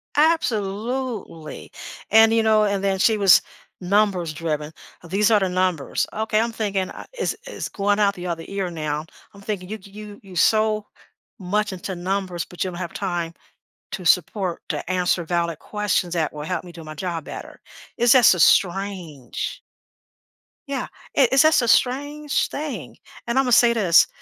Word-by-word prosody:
Absolutely. 230 - -1 0.4
And, 220 +1 +6
you 225 -1 +3
know, 215 -1 +4
and 200 -1 -1
then 195 -1 0
she 220 +2 +4
was 195 -2 +6 0.4
numbers-driven. 170 -6 0 0.4
"These 210 +4 +2
are 210 - +5
the 190 - 0
numbers." 180 -5 0
Okay, 220 0 0
I'm 230 +1 0
thinking, 200 -4 -2
"I - - -9
It's 485 -2 -2
it's - - -5
going 205 +1 0
out 200 -1 +3
the 180 -1 -7
other 165 -1 -3
ear 195 -2 -3
now." 155 -2 -3 0.3
I'm 200 - -14
thinking, 195 -3 -5
"You 215 - -4
g 195 - -15
you 210 0 -10
you're 190 -3 -13
so 215 +2 +2 0.5
much 205 +2 -1
into 185 0 -5
numbers 185 -1 -2
but 180 - -4
you 185 - -2
don't 175 - -8
have 175 -2 -5
time 175 -4 -3 0.6
to 185 -2 -5
support, 185 +1 +1
to 150 0 -3
answer 180 -1 +1
valid 170 -1 -1
questions 205 -4 -1
that 160 -3 0
will 150 0 -6
help 175 +1 -3
me 180 - -11
do 165 -1 -11
my 155 0 -8
job 170 -2 -4
better." - - -9 0.4
It's 240 0 +4
just 245 -6 +7
a - - -5
strange 180 - +1 1.1
Yeah. 275 -2 -3 0.3
It 265 -4 +5
it's 270 - +6
just 315 -2 +5
a 240 - -1
strange 285 +5 +1
thing. 295 0 -6 0.3
And 235 +2 -1
I'm 270 - +5
gonna 250 - 0
say 235 0 +6
this, 185 -7 +5
195 Hz, 175 wpm, -22 LUFS, 175-220 Hz, 1.1 s, just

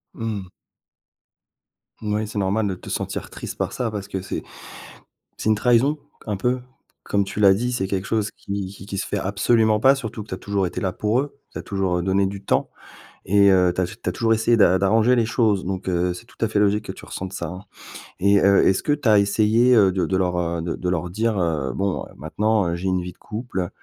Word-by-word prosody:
Mmh. 110 -4 -4 1.5
Moui, 105 0 -1
c'est 105 0 -4
normal 100 +2 +1
de 95 - -2
te - - -11
sentir - - -4
triste - - -7
par - - -2
ça, 120 -3 -2
parce 100 -2 -5
que 95 -2 -4
c'est 95 - -5 0.9
c'est 110 - -1
une 110 - +4
trahison, 125 +7 +3 0.3
un 105 -3 -2
peu. 125 +5 0 0.4
Comme 100 0 +1
tu 100 - -6
l'as 100 -2 +7
dit, 120 +5 -1
c'est 120 -6 -1
quelque 95 -1 -2
chose 110 -1 0
qui 100 -1 -5
qui 95 0 -11
qui 100 -1 -5
se 95 - -2
fait - - -2
absolument 110 +2 +2
pas, 135 +4 +5
surtout 110 -5 -6
que 105 - -20
tu - - -3
as - - -11
toujours 100 -1 -1
été 90 - -4
là 95 - 0
pour 110 +4 +1
eux, 140 0 -4
tu - - -7
as - - -4
toujours, 95 -3 -1
heu, - - -1
donné 95 +1 +2
du 100 +1 -5
temps - - 0 0.6
et 100 +1 +5
heu, 90 -1 +4
tu 90 - -1
as - - +2
j 90 - -9
tu - - -1
as - - -1
toujours 115 +4 +1
essayé 115 +1 +3
d'a 95 -3 +5
d'arranger 110 +6 +3
les 115 -2 +2
choses. 110 -5 +1
Donc, 95 +1 -4
heu, 90 0 +1
c'est 90 +7 -11
tout - - -22
à 115 - +3
fait 110 -1 0
logique 105 +1 +2
que - - -4
tu - - -12
ressentes 95 0 -6
ça, 85 -3 -4
hein 90 +3 -7 0.6
et 100 +1 +4
heu, 100 0 +5
est-ce 95 - +3
que 145 - +1
tu 145 -4 0
as 105 -1 +6
essayé, 110 +5 +3
heu, 100 -4 +5
de 95 -1 0
de 95 - 0
leur, 90 -1 0
heu, 85 -1 -1
de 85 - -3
de 90 - -4
leur 90 0 -1
dire: 110 +2 0
«Heu, 80 -6 0
bon, 100 -1 -1
heu, - - -14
maintenant, 105 - 0
heu, 85 - -1
j'ai 90 +2 -3
une 95 -1 0
vie 90 0 -6
de - - -30
couple, 105 -5 -4
100 Hz, 250 wpm, -22 LUFS, 95-110 Hz, 1.5 s, l'as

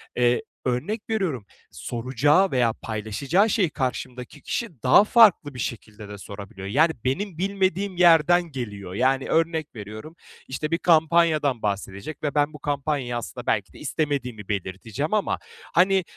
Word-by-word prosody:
eee, 125 - +2 0.2
örnek 195 - -2
veriyorum 180 - -1 0.3
soracağı 135 +10 +1
veya 120 -4 +2
paylaşacağı 115 - 0
şeyi 195 -5 +2
karşımdaki 130 0 -4
kişi 175 - -5
daha 130 +9 +7
farklı 210 -10 +5
bir 125 - -9
şekilde 105 -3 -6
de 105 - -8
sorabiliyor. 100 -1 -9
Yani, 155 +10 +3
benim 175 +6 -2
bilmediğim 195 0 -1
yerden 175 0 +5
geliyor. 105 -8 -6
Yani, 130 +4 +1
örnek 160 -3 0
veriyorum, 110 +9 -9 0.3
işte, 150 +4 -4
bir 165 - +2
kampanyadan 160 -6 +3
bahsedecek 100 +8 -4
ve 145 - -2
ben 145 +1 +2
bu 150 - -10
kampanyayı 140 -3 -2
aslında 120 - -7
belki - - 0
de - - -14
istemediğimi 125 -9 -3
belirteceğim 105 - -3
ama, 210 -2 0 0.3
hani, 190 +2 +4
140 Hz, 140 wpm, -24 LUFS, 115-170 Hz, 0.3 s, daha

